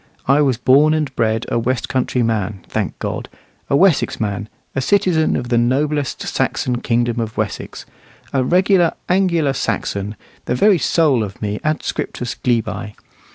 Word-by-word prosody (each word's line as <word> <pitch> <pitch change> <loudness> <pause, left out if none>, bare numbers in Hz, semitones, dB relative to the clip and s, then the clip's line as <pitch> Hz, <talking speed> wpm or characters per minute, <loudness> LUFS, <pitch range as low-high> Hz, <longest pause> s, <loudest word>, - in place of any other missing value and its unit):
I 140 +3 +4
was 135 -5 +2
born 140 +6 +4
and 150 -4 -2
bred 110 -1 0
a - - +1
west 125 0 -1
country 125 -1 0
man, 105 -4 -2
thank - - -3
God! - - -4 0.4
a - - +3
Wessex 180 0 +3
man, 105 0 -3 0.3
a 135 - 0
citizen 165 +1 +2
of 120 - -3
the 120 -1 +3
noblest 140 +3 0
Saxon 125 -1 -1
kingdom 120 0 0
of 110 -1 -4
Wessex, 110 -2 -4 0.5
a 135 -2 +2
regular 180 +3 +3 0.2
"Angular 170 -6 +2
Saxon," 100 -5 -2 0.3
the 125 - 0
very 195 +6 +4
soul 145 -4 +2
of 100 -3 -5
me 105 0 -3
adscriptus 150 -5 -2
glebae. 115 -3 -2
125 Hz, 155 wpm, -19 LUFS, 115-155 Hz, 0.5 s, I